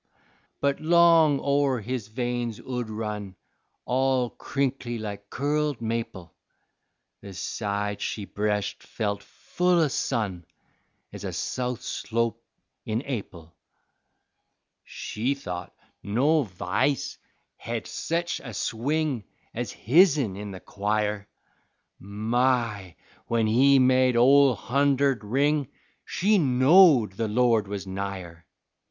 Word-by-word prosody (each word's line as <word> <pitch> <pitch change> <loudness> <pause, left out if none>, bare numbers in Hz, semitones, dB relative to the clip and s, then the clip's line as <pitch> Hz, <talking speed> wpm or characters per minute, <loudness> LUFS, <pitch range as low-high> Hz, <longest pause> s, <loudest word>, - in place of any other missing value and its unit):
But 140 0 +1
long 165 -3 +5
o' 140 0 +2
her 130 -3 0
his 115 0 -4
veins 120 0 -3
'ould 125 -3 -4
run 105 -3 -5 0.5
All 130 -1 +1
crinkly 130 -3 -2
like 100 -2 -7
curled 145 -1 -1
maple, 115 -5 -4 0.9
The 100 -2 -10
side 100 +1 -3
she 105 - -3
breshed 105 0 -2
felt 100 -2 -3
full 180 - 0
o' 155 -3 +3
sun 100 -11 -2 0.7
Ez - - -8
a - - -3
south 125 -2 -3
slope 115 0 -2 0.4
in 110 +4 -2
Ap'il. 90 - -6 1.3
She 125 +6 -3
thought 90 -10 -6 0.3
no 140 +8 +2
v'ice 95 +8 -1 0.4
hed 115 -1 -5
sech 170 +1 -2
a 120 -5 -8
swing 135 +3 -1 0.3
Ez - - -4
hisn 140 - +3
in 105 +1 -6
the 95 -1 -8
choir; 105 0 -2 0.7
My! 110 -1 -1 0.3
when 115 -1 +1
he 135 +6 +5
made 130 -1 +4
Ole 135 +1 +6
Hunderd 140 +3 +1
ring, 140 +5 +1 0.4
She 205 +3 +2
knowed 135 - +5
the 115 - -1
Lord 115 -1 +2
was 100 -1 -5
nigher. 95 -4 -6
120 Hz, 110 wpm, -26 LUFS, 105-140 Hz, 1.3 s, Ole